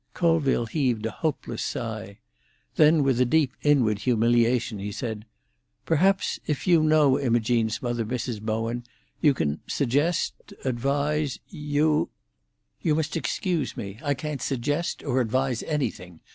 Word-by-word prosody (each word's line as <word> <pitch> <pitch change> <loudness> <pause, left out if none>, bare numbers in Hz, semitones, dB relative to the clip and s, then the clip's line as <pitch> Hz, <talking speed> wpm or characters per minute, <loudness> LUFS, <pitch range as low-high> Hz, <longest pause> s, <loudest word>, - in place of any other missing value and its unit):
Colville 160 -8 +2
heaved 120 -4 0
a 115 - -1
hopeless 155 +5 -3
sigh. 110 -4 -5 0.6
Then 155 0 +5
with 130 -2 +2
a - - +7
deep 140 0 +2
inward 125 -8 +3
humiliation, 120 -1 +2
he 100 +1 -4
said, 110 -2 -5 0.6
"Perhaps 190 +5 +2
if 150 -3 -2
you 170 -3 +5
know 155 -3 +4
Imogene's 115 -3 +1
mother, 120 -1 -1
Mrs. 120 -1 -3
Bowen, 115 +2 -2 0.4
you 145 -3 +4
can 75 - -1
suggest—advise—You—" 145 - 0 0.7
"You 155 -3 +2
must 155 -1 -1
excuse 165 -3 -1
me; 100 +1 -6
I 145 -2 0
can't 150 0 -5
suggest 145 +6 -2
or 130 -2 +1
advise 125 +1 0
anything. 90 - -3
130 Hz, 125 wpm, -26 LUFS, 115-150 Hz, 0.7 s, a